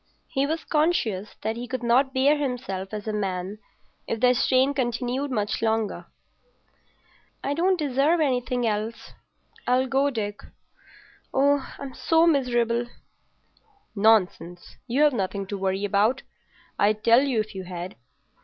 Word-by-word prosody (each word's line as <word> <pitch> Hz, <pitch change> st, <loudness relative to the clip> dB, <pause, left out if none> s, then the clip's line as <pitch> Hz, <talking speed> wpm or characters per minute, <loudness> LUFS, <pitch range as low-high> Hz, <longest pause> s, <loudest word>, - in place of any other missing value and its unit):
He 270 Hz, +1 st, 0 dB
was 320 Hz, +2 st, -2 dB
conscious 245 Hz, -, 0 dB
that 220 Hz, +1 st, -1 dB
he 240 Hz, +1 st, -6 dB
could 255 Hz, -1 st, -4 dB
not 255 Hz, +3 st, +3 dB
bear 270 Hz, +3 st, +3 dB
himself 245 Hz, -10 st, -3 dB
as 215 Hz, 0 st, -6 dB
a 215 Hz, -, -1 dB
man 195 Hz, 0 st, -3 dB, 0.5 s
if 225 Hz, -, -2 dB
the 250 Hz, +2 st, +5 dB
strain 260 Hz, +2 st, +2 dB
continued 255 Hz, +1 st, -1 dB
much 210 Hz, -5 st, -1 dB
longer. 220 Hz, -1 st, -1 dB, 1.4 s
"I 280 Hz, -, 0 dB
don't 365 Hz, +4 st, +2 dB
deserve 295 Hz, +2 st, +2 dB
anything 250 Hz, -4 st, 0 dB
else. 215 Hz, +1 st, -3 dB, 0.6 s
I'll 255 Hz, +1 st, +3 dB
go, 270 Hz, +2 st, +2 dB
Dick. 205 Hz, -5 st, -4 dB, 0.9 s
Oh, 280 Hz, +1 st, +2 dB
I'm 275 Hz, -2 st, -7 dB
so 325 Hz, 0 st, +3 dB
miserable." 240 Hz, -6 st, +1 dB, 1.1 s
"Nonsense. 200 Hz, -4 st, +1 dB
You've 285 Hz, +4 st, +3 dB
nothing 195 Hz, -2 st, -2 dB
to 200 Hz, +1 st, -5 dB
worry 190 Hz, +1 st, -1 dB
about; 210 Hz, +6 st, +1 dB, 0.6 s
I'd 210 Hz, +1 st, +2 dB
tell 235 Hz, +2 st, +6 dB
you 270 Hz, -5 st, 0 dB
if 215 Hz, 0 st, -3 dB
you 190 Hz, -1 st, -6 dB
had. 180 Hz, 0 st, -6 dB
240 Hz, 135 wpm, -25 LUFS, 210-275 Hz, 1.4 s, tell